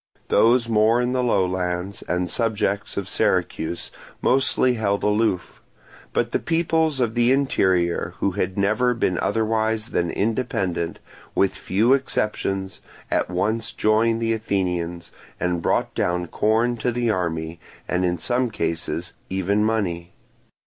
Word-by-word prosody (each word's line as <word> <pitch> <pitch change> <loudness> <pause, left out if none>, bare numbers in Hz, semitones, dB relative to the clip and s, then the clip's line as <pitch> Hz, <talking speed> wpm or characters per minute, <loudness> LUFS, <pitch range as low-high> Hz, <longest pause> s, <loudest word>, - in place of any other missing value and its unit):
Those 115 +1 +4
more 110 +1 +3
in 125 0 0
the 130 0 0
low 100 -6 +2
lands, 90 +1 -3
and 90 0 0
subjects 100 0 -1
of 100 -2 -2
Syracuse, 85 -1 -1 0.3
mostly 130 -1 +3
held 100 -3 -1
aloof; 105 -4 0 0.5
but - - 0
the - - +1
peoples 160 -3 +1
of 120 -3 +1
the 120 +1 +3
interior 95 -11 +1
who 100 - 0
had 95 +1 -2
never 110 +5 +2
been 90 -6 0
otherwise 110 +1 0
than 85 -1 0
independent, 100 -7 -1 0.4
with 95 - +2
few 110 +7 +2
exceptions, 100 -7 -1 0.3
at - - +1
once 105 +5 -1
joined 115 +1 +2
the 115 0 +2
Athenians, 90 -5 -2 0.3
and 90 -1 0
brought - - 0
down 90 0 0
corn 110 +7 +1
to 120 +2 0
the 120 -1 0
army, 80 -3 -2 0.3
and 90 0 0
in 90 -1 +1
some 125 +3 0
cases 85 -4 -3 0.2
even 95 +3 +1
money. 90 -6 -1
105 Hz, 135 wpm, -23 LUFS, 90-115 Hz, 0.5 s, Those